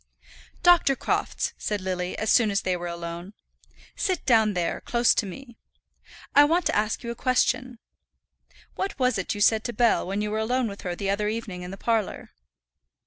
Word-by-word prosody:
"Dr. 345 -6 +5
Crofts," - - -2
said 210 -1 -2
Lily, 185 -1 -3
as 220 0 0
soon 230 -3 +4
as 200 -1 0
they 185 - 0
were 175 0 -5
alone. 170 +2 -6 0.6
"Sit 370 -5 -1
down 220 -5 +4
there, 175 -1 -1
close 240 -1 +3
to 205 - -1
me. 240 +5 -10 0.8
I 290 - +8
want 330 +3 +2
to - - +1
ask 210 +1 0
you 235 - -4
a - - -6
question. 255 0 0 1.0
What 390 - -4
was 250 -5 +1
it 195 - -2
you 205 - -5
said 220 +1 +4
to 240 - -3
Bell 230 -4 +2
when 200 +2 -2
you 210 - -3
were 215 - -1
alone 245 +3 0
with 200 -1 -8
her 180 -1 -4
the 195 +2 -2
other 210 +1 -1
evening 210 -4 -4
in 180 - -7
the 195 - -7
parlour?" 225 -1 -2
215 Hz, 195 wpm, -25 LUFS, 195-245 Hz, 1.0 s, I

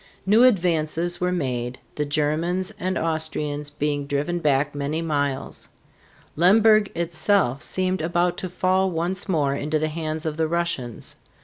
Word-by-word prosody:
New 210 +4 +5
advances 175 -5 +2
were 180 0 +1
made, 125 -7 -2 0.2
the 150 - -2
Germans 155 +5 -1
and 185 0 -1
Austrians 150 -2 -2
being 145 -1 -2
driven 145 +5 -1
back 145 -2 +1
many 145 +2 -2
miles. 145 -4 -2 0.7
Lemberg 215 +5 +5
itself 170 -4 +1
seemed 185 -1 0
about 175 +2 +1
to 185 - -4
fall 185 +1 +1
once 180 +3 -3
more 145 -6 +1
into 150 +2 -1
the 155 +1 -1
hands 155 0 -4
of 155 -1 -3
the 160 -1 +1
Russians. 165 -8 -3
160 Hz, 140 wpm, -23 LUFS, 145-180 Hz, 0.7 s, New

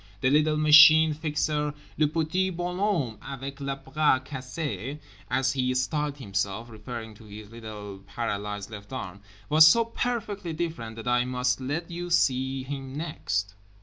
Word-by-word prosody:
The 130 - +3
little 150 +1 +3
Machine 155 +1 +8
Fixer 150 -1 -1 0.2
(le 150 - +3
petit 165 +5 0
bonhomme 175 - -1
avec 135 0 -7
le 140 -1 -2
bras 135 0 +1
cassé 135 +1 -5 0.3
as 130 0 +1
he 130 -1 0
styled 145 +3 -1
himself, 100 0 -3
referring 110 0 -7
to 110 +1 -16
his 105 0 -11
little 105 -4 -8
paralysed 105 -1 -4
left 100 0 -10
arm) 100 -7 -6 0.3
was 155 +1 +8
so 230 +8 +5
perfectly 215 -6 -3
different 155 -9 -4
that 115 +1 -8
I 125 0 +3
must 125 0 0
let 155 +6 -3
you 175 +1 -5
see 130 -4 +1
him 135 0 -6
next. 100 - -2
135 Hz, 150 wpm, -27 LUFS, 115-155 Hz, 0.3 s, Machine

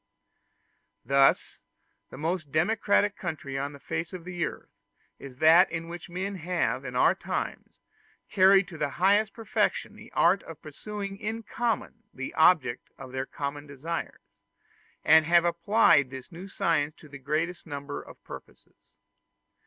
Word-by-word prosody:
Thus 135 +2 +3 0.5
the - - -10
most 155 -1 -3
democratic 205 +4 +2
country 155 -6 -5
on 140 +1 -3
the 140 - -12
face 165 +5 -4
of 175 -2 -8
the 175 -1 -3
earth - - -6 0.5
is 130 -2 -11
that 160 +5 +6
in 165 0 -5
which 175 +1 -8
men 190 +3 -4
have 175 +1 -1
in - - -7
our - - +5
time - - -4 0.6
carried 195 -1 +5
to 160 -4 -10
the 150 - 0
highest 205 +4 +3
perfection 225 -1 -1
the - - -14
art - - +4
of - - -11
pursuing 200 -2 -7
in 225 +2 -4
common 235 0 -3
the 135 0 -6
object 160 -7 +3
of 130 - -10
their 130 +1 -3
common 145 +1 -5
desires, 145 +5 -5 0.8
and 160 -1 +6
have 170 0 +5
applied 170 - +4
this 130 +5 -10
new 175 +3 -9
science 155 -5 0
to 155 - -16
the 140 -1 -11
greatest 160 +6 -2
number 145 -1 -6
of - - -15
purposes. - - -14
165 Hz, 150 wpm, -27 LUFS, 145-190 Hz, 0.8 s, that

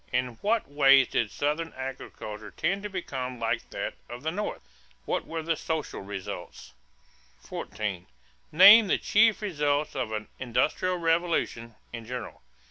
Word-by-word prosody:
In 125 0 +1
what 220 +2 +1
ways 135 -2 +5
did 115 - 0
Southern 150 +6 -2
agriculture 110 -5 -7
tend 195 - -1
to 210 - -5
become 130 -10 -5
like 115 +1 -2
that - - -4 0.2
of 120 +2 -8
the 160 - -1
North? 205 +4 -4 0.4
What - - -2
were 165 -1 -4
the 165 +1 0
social 160 0 -4
results? 100 -1 -7 0.7
14. 100 -4 -5 0.4
Name 215 +1 +9
the - - +2
chief 220 0 +3
results 150 -6 0
of 130 -5 -2
an 110 0 -4
"industrial 155 +9 0
revolution" 165 -9 0 0.2
in 115 -1 -6
general. 125 - -6
140 Hz, 140 wpm, -27 LUFS, 115-170 Hz, 0.7 s, Name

